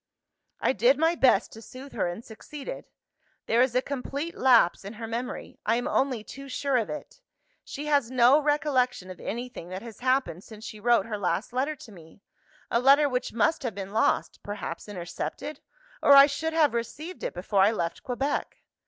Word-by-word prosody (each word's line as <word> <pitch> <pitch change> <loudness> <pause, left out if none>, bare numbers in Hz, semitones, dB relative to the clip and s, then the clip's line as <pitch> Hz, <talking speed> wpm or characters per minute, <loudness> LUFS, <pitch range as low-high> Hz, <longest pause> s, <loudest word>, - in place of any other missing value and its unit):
"I - - +2
did 245 +5 +4
my 325 +2 +3
best 255 - +3
to 225 - -11
soothe 260 +4 -11
her, - - 0
and 175 +7 -6
succeeded. 290 - -8 0.6
There 230 +2 +3
is 250 -1 +2
a 255 - +2
complete 285 +4 -4
lapse 240 -10 +4
in 200 +3 -7
her 225 +1 -7
memory 235 +3 -5
I - - +2
am 245 - -1
only 255 -5 0
too 275 +5 -10
sure 275 0 0
of 225 - -1
it! 300 +11 -8 0.4
She 290 +1 -7
has 285 -5 +2
no 255 +3 +5
recollection 260 -9 0
of 180 - -11
anything 240 -6 -6
that 185 +3 -6
has 230 -2 -10
happened 255 -8 0
since 220 0 -12
she 220 -2 -8
wrote 240 +2 +3
her 215 -2 -4
last 185 +4 -1
letter 275 +5 0
to 245 -5 -13
me 170 +1 -16 0.5
a 235 - +3
letter 280 +4 +6
which 250 -2 -2
must 235 +9 +1
have 240 -6 -4
been 195 0 -6
lost 220 - +1
(perhaps 205 -2 -6
intercepted?), 195 - -6 0.4
or 285 - +7
I 275 0 +10
should 320 +3 -3
have 310 -5 +3
received 300 +10 -5
it - - -4
before 190 +2 +1
I 200 +3 +5
left 170 -6 -3
Quebec. 270 +3 -3
245 Hz, 190 wpm, -27 LUFS, 210-280 Hz, 0.6 s, I